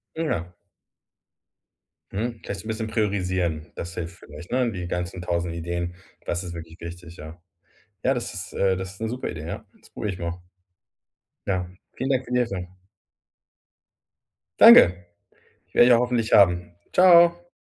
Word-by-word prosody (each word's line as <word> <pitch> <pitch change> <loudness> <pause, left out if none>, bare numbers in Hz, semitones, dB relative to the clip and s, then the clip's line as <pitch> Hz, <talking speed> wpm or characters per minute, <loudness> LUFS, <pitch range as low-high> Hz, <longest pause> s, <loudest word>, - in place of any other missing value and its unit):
Ja. 90 - -2 1.6
Mhm. 115 +3 -3
Vielleicht 100 - -5
so - - -18
'n - - -7
bisschen 110 0 -3
priorisieren, 95 -7 -1
das 85 0 -6
hilft 85 +2 -6
vielleicht, 75 +4 -12
ne, 125 -2 +1
die 90 -3 -5
ganzen 90 +1 -4
1.000 85 -1 -2
Ideen. 85 +1 -4 0.3
Das 85 +2 -2
ist 85 -1 -7
wirklich 80 0 -10
wichtig, 85 0 -9
ja. 80 +3 -10 0.7
Ja, 135 - +3
das 120 - -4
ist, 95 0 -7
äh 95 -1 +1
das 95 0 -6
ist 100 - -17
'ne 110 - -2
super 125 +3 -4
Idee, 80 -2 -7
ja. - - -6 0.2
Das - - -21
probiere 105 -2 -4
ich 90 - -8
mal. 85 +1 -5 1.1
Ja, 90 -2 -1 0.3
vielen 135 +1 -2
Dank 130 -1 +1
für 125 - -8
die 125 - +3
Hilfe. 95 -7 -2 1.9
Danke. 90 0 +8 0.7
Werde 120 - +6
ich - - +5
ja 120 - +6
hoffentlich 120 -2 0
haben. 90 -3 +4 0.2
Ciao. 175 -1 +6
90 Hz, 160 wpm, -24 LUFS, 85-115 Hz, 1.9 s, Danke